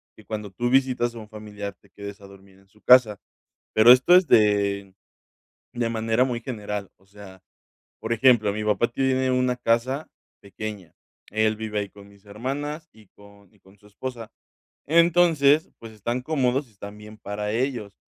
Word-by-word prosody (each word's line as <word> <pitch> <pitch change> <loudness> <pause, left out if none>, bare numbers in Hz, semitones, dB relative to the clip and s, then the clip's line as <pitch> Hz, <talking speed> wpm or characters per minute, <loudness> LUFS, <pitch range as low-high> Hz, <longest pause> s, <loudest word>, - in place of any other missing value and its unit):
que - - -18
cuando 105 -2 -6
tú 120 +6 -2
visitas 125 -2 +1
a 115 - -7
un 105 - -11
familiar 105 -2 -8
te - - -25
quedes 100 0 -10
a 100 - -12
dormir 95 0 -18
en 100 - -26
su 105 +2 -27
casa, 120 -6 +5 0.5
pero 110 +3 +7
esto 130 +8 +6
es 185 0 +6
de 100 -3 +2 0.8
de 120 -1 -1
manera 115 +2 +1
muy 120 -2 -3
general, 105 -5 -6
o 95 - -29
sea, 95 -2 -14 0.6
por 110 - -3
ejemplo, 115 -3 +4
mi 105 +1 -4
papá 105 +3 +1
tiene 130 +1 0
una 125 -1 +1
casa 125 +4 -1 0.3
pequeña, 100 -3 -8 0.4
él 110 +1 +1
vive 105 -1 -3
ahí 100 - -5
con 100 0 -16
mis 100 0 -21
hermanas 145 +9 -5
y 110 -3 -20
con 100 -1 -20
y - - -28
con 95 +2 -22
su 105 - -22
esposa, 115 +1 -8 0.5
entonces 165 -2 +3
pues 115 -1 -11
están 120 +4 -3
cómodos 135 -1 0
y - - -25
están 100 +1 -11
bien 105 +1 -13
para 105 0 -5
ellos, 120 -4 -2
110 Hz, 175 wpm, -24 LUFS, 100-125 Hz, 0.8 s, pero